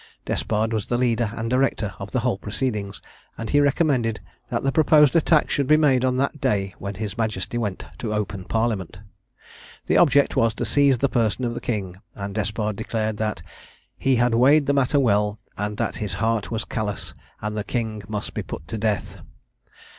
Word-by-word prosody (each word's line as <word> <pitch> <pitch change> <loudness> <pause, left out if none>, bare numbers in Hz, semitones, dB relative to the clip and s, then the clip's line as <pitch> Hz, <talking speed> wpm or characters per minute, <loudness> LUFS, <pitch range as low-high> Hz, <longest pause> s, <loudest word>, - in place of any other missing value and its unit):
Despard 110 +1 -1
was 110 -3 -2
the 120 - 0
leader 120 -3 +1
and 110 - -3
director 125 -5 +1
of 100 - -6
the 130 - -1
whole 120 -5 0
proceedings; 105 -3 -3 0.3
and 115 - -4
he 145 - +4
recommended 135 -6 +2 0.3
that - - -2
the 135 - +2
proposed 150 0 +5
attack 160 -1 +4
should 140 -2 +1
be 155 - +6
made 135 -5 +3
on 130 0 +1
that 140 +2 -1
day 100 -7 0
when 100 0 -5
his 105 +1 -5
Majesty 110 -2 -2
went 105 -5 -3
to 110 - -3
open 105 -3 -3
Parliament. 110 -6 -1 0.9
The - - +2
object 140 -4 +4
was 115 -1 +2
to 120 - -2
seize 140 +3 +3
the 140 - +2
person 120 -1 0
of 120 - -1
the - - -5
King; 95 -6 -3 0.2
and 100 0 -5
Despard 105 0 -2
declared 110 -1 -2
that 110 0 -2 0.5
"he 135 -1 +2
had 120 0 +2
weighed 140 +6 +5
the 140 - +2
matter 140 +1 +2
well, 105 -4 +2 0.2
and 105 0 -3
that - - -2
his 105 -3 -3
heart 110 +1 0
was 115 -1 -3
callous, 105 -3 -4 0.3
and 105 0 -4
the 105 - -2
King 110 -2 -3
must 105 -1 -4
be - - -2
put 75 - -8
to 110 - -3
death." 105 -2 -1
115 Hz, 190 wpm, -23 LUFS, 105-130 Hz, 0.9 s, be